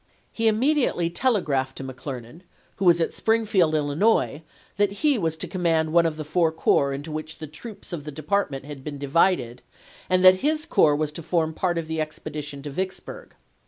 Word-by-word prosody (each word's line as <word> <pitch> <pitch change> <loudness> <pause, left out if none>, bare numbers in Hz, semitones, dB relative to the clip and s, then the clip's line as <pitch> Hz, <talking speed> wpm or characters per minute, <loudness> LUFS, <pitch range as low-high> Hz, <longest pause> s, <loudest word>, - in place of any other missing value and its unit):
He 225 0 0
immediately 225 - +2
telegraphed 150 - 0
to - - -6
McClernand, 130 +2 -8 0.4
who 195 - -2
was 170 -1 +6
at 165 - 0
Springfield, 210 -8 +2
Illinois, 150 +3 +1 0.4
that 205 -1 +2
he 290 -6 +4
was 160 -3 -1
to - - -2
command 165 -4 0
one 170 -1 +5
of 155 -1 -4
the 155 - -4
four 160 +2 +1
corps 140 -3 +2
into 145 +3 -5
which 155 0 -5
the 155 - -6
troops 185 +7 -9
of 155 -4 -4
the 150 - -7
department 150 -2 -2
had 145 -2 -9
been 145 -1 -6
divided, 140 -4 +1 0.5
and 185 0 +3
that 185 0 +9
his 310 +4 0
corps 150 -2 +4
was 150 0 -1
to 160 - -7
form 160 -1 0
part 175 +1 -1
of 165 -1 -3
the 160 0 -2
expedition 150 -2 -6
to 145 - -6
Vicksburg. 190 - -5
160 Hz, 190 wpm, -24 LUFS, 145-185 Hz, 0.5 s, that